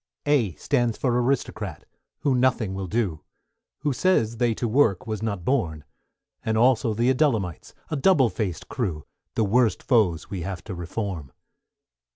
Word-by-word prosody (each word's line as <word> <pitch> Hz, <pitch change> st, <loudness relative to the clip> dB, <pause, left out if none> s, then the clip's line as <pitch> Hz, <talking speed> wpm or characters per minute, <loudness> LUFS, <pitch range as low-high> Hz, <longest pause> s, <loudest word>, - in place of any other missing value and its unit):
=A= 130 Hz, -, +2 dB
stands 120 Hz, -3 st, 0 dB
for 125 Hz, -3 st, +1 dB
Aristocrat, 130 Hz, +1 st, -2 dB, 0.4 s
who 140 Hz, -, +2 dB
nothing 125 Hz, -5 st, +2 dB
will 95 Hz, -1 st, -4 dB
do, 95 Hz, -6 st, -1 dB, 0.6 s
Who 145 Hz, -, 0 dB
says 120 Hz, -8 st, +2 dB
they 120 Hz, -1 st, +1 dB
to 120 Hz, -, -2 dB
work 110 Hz, -5 st, +2 dB
was 110 Hz, -2 st, -4 dB
not 100 Hz, -6 st, -3 dB
born; 85 Hz, -, 0 dB, 0.6 s
And 110 Hz, 0 st, 0 dB
also 115 Hz, -2 st, +3 dB
the 120 Hz, +4 st, +3 dB
Adullamites, 115 Hz, -, 0 dB, 0.2 s
a -, -, 0 dB
double 140 Hz, -, +4 dB
faced 90 Hz, -3 st, -3 dB
crew, 90 Hz, -, -3 dB, 0.3 s
The 115 Hz, -, +2 dB
worst 110 Hz, -2 st, +2 dB
foes 105 Hz, -, +2 dB
we 95 Hz, -3 st, -5 dB
have 95 Hz, +1 st, -5 dB
to 100 Hz, -, -6 dB
Reform. 85 Hz, -, -4 dB
110 Hz, 155 wpm, -25 LUFS, 95-125 Hz, 0.6 s, double